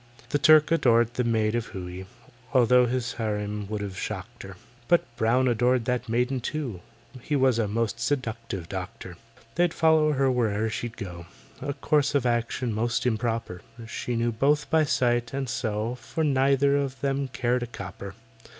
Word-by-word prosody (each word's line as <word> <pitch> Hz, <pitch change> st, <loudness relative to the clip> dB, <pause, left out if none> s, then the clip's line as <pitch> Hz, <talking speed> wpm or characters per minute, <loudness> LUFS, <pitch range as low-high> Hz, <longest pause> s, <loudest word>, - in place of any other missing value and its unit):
The 145 Hz, -, +1 dB
Turk 155 Hz, +1 st, +6 dB
adored 120 Hz, -7 st, +3 dB
the 125 Hz, -, 0 dB
maid 110 Hz, -2 st, +1 dB
of 120 Hz, -1 st, -1 dB
Hooe 90 Hz, 0 st, -7 dB, 0.5 s
(Although 125 Hz, 0 st, +5 dB
his 125 Hz, +1 st, -2 dB
harem 105 Hz, -2 st, -3 dB
would 105 Hz, -1 st, -3 dB
have 100 Hz, -2 st, -5 dB
shocked 105 Hz, +4 st, -6 dB
her). 95 Hz, -1 st, -10 dB, 0.3 s
But 175 Hz, -, +4 dB
BROWN 120 Hz, +4 st, +2 dB
adored 125 Hz, 0 st, +2 dB
that 125 Hz, -1 st, -1 dB
maiden 125 Hz, +3 st, +1 dB
too: 125 Hz, -, -4 dB, 0.4 s
He 150 Hz, -, -2 dB
was 130 Hz, -4 st, +3 dB
a 110 Hz, -, +1 dB
most 115 Hz, +2 st, -1 dB
seductive 115 Hz, -, -3 dB
doctor. -, -, -7 dB, 0.4 s
They'd 175 Hz, -1 st, +1 dB
follow 160 Hz, -2 st, +4 dB
her 135 Hz, -1 st, +2 dB
where'er 110 Hz, -3 st, 0 dB
she'd 115 Hz, +1 st, -5 dB
go— 85 Hz, -5 st, -7 dB, 0.3 s
A 140 Hz, +1 st, -2 dB
course 145 Hz, 0 st, +1 dB
of 135 Hz, -3 st, +2 dB
action 120 Hz, 0 st, 0 dB
most 115 Hz, +3 st, -1 dB
improper; 115 Hz, -6 st, -1 dB, 0.3 s
She 120 Hz, +1 st, -4 dB
neither 115 Hz, 0 st, 0 dB
knew 145 Hz, +2 st, +6 dB, 0.2 s
by 160 Hz, -1 st, +4 dB
sight, 120 Hz, -3 st, +1 dB
and 135 Hz, -1 st, -2 dB
so 115 Hz, -1 st, -2 dB
For 125 Hz, +6 st, -4 dB
neither 140 Hz, 0 st, +3 dB
of 135 Hz, -2 st, -3 dB
them 140 Hz, 0 st, 0 dB
cared 125 Hz, -1 st, 0 dB
a 120 Hz, -, -3 dB
copper. 100 Hz, -3 st, -8 dB
120 Hz, 170 wpm, -26 LUFS, 110-135 Hz, 0.5 s, Turk